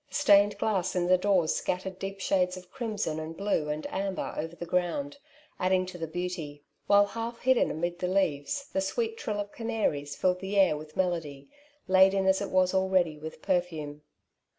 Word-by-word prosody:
The - - -9
stained 205 -7 +5
glass 190 -4 0
in 180 -1 +1
the 185 +1 +5
doors 185 -5 +2
scjattered 185 +1 -3
deep 195 0 -5
shades 185 -1 +1
of 180 0 -13
crimson 215 -11 -3
and 160 +1 -6
blue 195 -7 0
and 150 +1 -3
amber 195 0 -2
over 165 +2 -4
the 175 - -6
ground^ 180 - -1 0.4
adding 185 0 +2
to 180 -1 -9
the 165 - -3
beauty; 160 -4 -5 0.2
while, 205 0 +6
half 230 +2 -5
hidden 260 0 +3
amid 175 +2 -3
the 180 - -1
leaves, 185 - 0
the 190 - +1
sweet 450 - -1
trill 215 - -3
of 205 0 -4
canaries 210 -12 -2
filled 180 +2 +1
the 195 +2 -3
air 190 -5 +5
with 155 0 -10
melody, 160 -7 -2 0.4
laden 190 +1 +5
as 190 +1 +3
it 200 - -3
was 185 0 +2
already 185 -5 +2
with 155 +1 -9
perfume. 160 -5 -2
185 Hz, 185 wpm, -28 LUFS, 165-200 Hz, 0.4 s, while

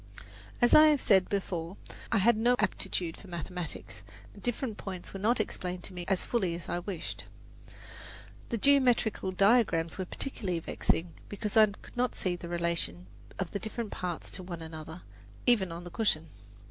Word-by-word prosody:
As 240 - +5
I 310 0 +10
have 300 -2 +4
said 190 -6 +4
before, 185 -3 -2 0.3
I 225 - +4
had 225 +4 +5
no 240 +3 +3
aptitude 170 -8 -1
for 200 - -13
mathematics; 175 0 -6 0.3
the - - -13
different 245 -2 -2
points 185 -3 -6
were 195 - -5
not 225 +5 +2
explained 180 -4 -3
to - - -4
me 175 -1 -5
as 195 -2 +1
fully 190 -8 0
as 170 - -8
I 175 - -1
wished. 175 -2 -5 1.2
The 235 - 0
geometrical 245 -6 +3
diagrams 190 -4 +3
were 185 - -1
particularly 185 -5 -3
vexing 165 +1 -1 0.2
because 205 0 -4
I 220 -1 +8
could 200 - -12
not 250 +1 0
see 180 -2 -1
the 170 -1 -8
relation 170 - -1 0.3
of 185 -3 -3
the 200 - -2
different 220 0 -4
parts 175 -2 -4
to 190 - -6
one 175 -2 -6
another, 160 +1 -8 0.4
even 205 -8 +4
on 170 +1 -6
the 175 - -8
cushion. 165 -7 +1
190 Hz, 170 wpm, -30 LUFS, 175-220 Hz, 1.2 s, I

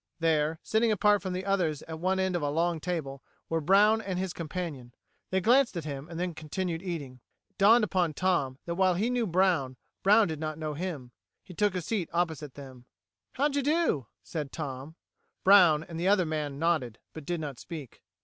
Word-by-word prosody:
There, 160 -1 +1
sitting 220 +1 +2
apart 210 -1 +3
from 185 0 -4
the 185 +1 -4
others 175 -7 0
at 160 -1 -7
one 190 +2 0
end 190 -1 0
of 175 - -1
the 145 - 0
long 165 +2 0
table, 150 -6 -4 0.3
were 165 0 0
Brown 205 +7 +4
and 190 -4 -4
his 185 -1 -2
companion! 155 -7 -6 0.3
They 190 0 +1
glanced 245 -1 +3
at 165 - -4
him, 140 +1 -6
and 165 -1 -6
then 180 -1 -2
continued 165 +2 -4
eating. 150 -9 -5 0.3
It - - -46
dawned 220 +4 +6
upon 180 -7 0
Tom 155 -8 0
that 170 - -2
while 185 0 +2
he 220 +7 0
knew 245 -3 0
Brown, 170 -8 +1 0.2
Brown 210 +2 +5
did 160 -2 -4
not 155 -1 -4
know 155 -1 -3
him. 150 -6 -5 0.3
He 180 - -12
took 205 +1 +1
a 180 - -2
seat 195 -3 -2
opposite 160 -5 -2
them. 130 -3 -11 0.5
"How 285 +3 +2
d'you 285 0 0
do?" 290 - +1 0.2
said 150 -5 -5
Tom. 145 0 -6 0.5
Brown 180 -6 +6
and 165 0 -8
the 175 - 0
other 195 -2 +4
man 150 -3 -3
nodded, 150 -8 0 0.2
but 160 - -8
did 175 -1 -1
not 145 -5 -6
speak. 150 -6 -9
170 Hz, 200 wpm, -29 LUFS, 150-190 Hz, 0.5 s, dawned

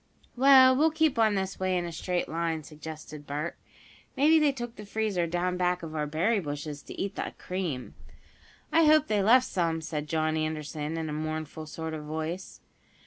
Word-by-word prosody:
"Well, 260 0 +7
we'll 310 +4 +4
keep 315 -5 +1
on 215 -2 +4
this 190 0 -2
way 185 -1 +1
in 175 - -1
a 170 - -5
straight 175 +2 -2
line," 165 -1 -2
suggested 155 -1 -9
Bert. 150 +4 -3 0.6
"Maybe 310 +4 +5
they 300 -2 +4
took 240 -3 -6
the 210 - -9
freezer 205 -4 -1
down 180 +2 -1
back 180 -1 0
of 160 -1 -6
our 150 -1 -1
berry 185 +9 +1
bushes 145 -2 -5
to - - -10
eat 195 0 -2
the - - -4
cream." 175 -9 -4 0.8
"I 325 0 +5
hope 305 -1 +6
they 210 -5 +1
left 245 +6 +5
some," 170 -8 0
said 150 -2 -5
John 155 -1 +1
Anderson, 155 0 -3
in 160 -1 -3
a 150 - -4
mournful 155 0 -4
sort 160 +1 -5
of 155 -1 -5
voice. 160 +4 -5
170 Hz, 190 wpm, -28 LUFS, 155-215 Hz, 0.8 s, Well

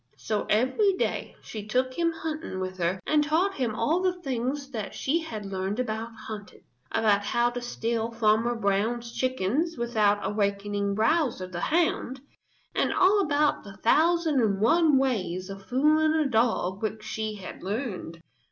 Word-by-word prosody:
So 215 -2 -2
every 260 - +3
day 370 - -2
she 210 -2 -7
took 255 +3 0
him 335 +3 +1
hunting 315 - -5
with 185 0 -4
her 175 +2 0
and 300 -1 +3
taught 330 +7 +1
him 245 - -2
all 320 +9 +1
the 365 -1 0
things 270 +2 -2
that 220 -5 -5
she 310 +5 0
had 225 -11 -6
learned 195 +3 -3
about 225 -2 -2 0.2
hunting: 210 -2 -8 0.3
about 210 -2 +2
how 240 +4 +1
to 245 0 -5
steal 230 -1 -2
Farmer 225 +1 +2
Brown's 225 +3 -1
chickens 260 - 0
without 215 -4 +1
awakening 200 -1 -1
Bowser 230 - +1
the 180 -1 -6
Hound, 315 -5 0 0.5
and - - +1
all 400 +2 +4
about 300 -3 +1
the 195 -2 -11
thousand 320 - +3
and 200 -4 +1
one 300 +6 +4
ways 195 -8 -1
of 195 0 -10
fooling 310 +4 +3
a 310 -2 +2
dog 220 -6 +1
which 215 0 -3
she 220 0 -3
had 195 -3 -9
learned. 190 -5 -4
230 Hz, 160 wpm, -27 LUFS, 205-295 Hz, 0.5 s, all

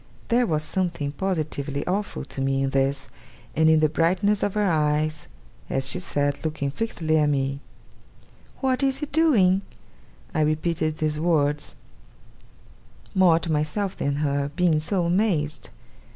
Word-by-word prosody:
There 240 +1 +3
was 155 -3 0
something 170 -3 -2
positively 150 -4 -2
awful 195 -5 -2
to 135 - -6
me 135 0 +1
in 135 - -1
this, 135 +1 0 0.5
and 160 +1 +4
in 160 -1 +5
the 155 - +5
brightness 185 +7 +1
of 205 - -1
her 210 - +2
eyes, 155 -2 0 0.4
as 135 0 -1
she 180 - +1
said, 145 -5 -1
looking 150 -3 -2
fixedly 160 -5 0
at 150 -1 +3
me: 135 -1 -1 1.0
'What 260 -1 +1
is 270 -1 +1
he 300 - -3
doing?' 245 - +3 0.7
I 155 - +1
repeated 155 +1 0
the 155 -1 -1
words, 150 - 0 1.4
more 180 -4 +5
to 165 0 -3
myself 155 +6 -1
than 140 0 -1
her, 140 -1 0
being 175 -4 +3
so 175 +3 -1
amazed. 170 - 0
155 Hz, 145 wpm, -24 LUFS, 145-185 Hz, 1.4 s, in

